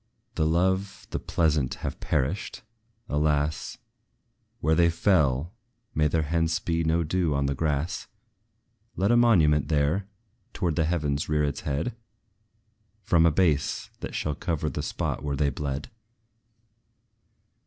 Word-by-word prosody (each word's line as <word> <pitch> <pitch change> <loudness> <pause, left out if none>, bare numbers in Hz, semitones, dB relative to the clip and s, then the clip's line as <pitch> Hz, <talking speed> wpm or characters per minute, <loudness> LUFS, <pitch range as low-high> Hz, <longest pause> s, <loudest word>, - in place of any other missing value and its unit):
The 80 - +1
lovely, 95 +4 0
the - - -2
pleasant 75 -5 +1
have - - -4
perished! 80 - -2 0.4
Alas! 75 0 0 0.8
Where 80 +2 +2
they 85 +1 +4
fell 80 -3 +2 0.4
may 75 0 +3
there 80 +1 +1
hence 80 +2 0
be 85 -1 -1
no 80 +1 +2
dew 85 -2 0
on 70 0 +1
the 70 - 0
grass! 75 +5 -2 0.9
Let 100 +4 +2
a - - +5
monument 80 -12 +4
there, 75 +6 +1 0.5
towards 85 -5 -1
the 80 - +3
heavens 75 -4 -1
rear 75 0 +2
its 70 -1 -2
head, 75 - -2 1.1
From 85 -2 +4
a - - +4
base, 75 -4 +1
that - - -6
shall 75 - -1
cover 85 -1 -2
the - - -3
spot - - -3
where 70 -1 -2
they 70 0 +1
bled! 70 - -4
80 Hz, 135 wpm, -26 LUFS, 75-85 Hz, 1.1 s, a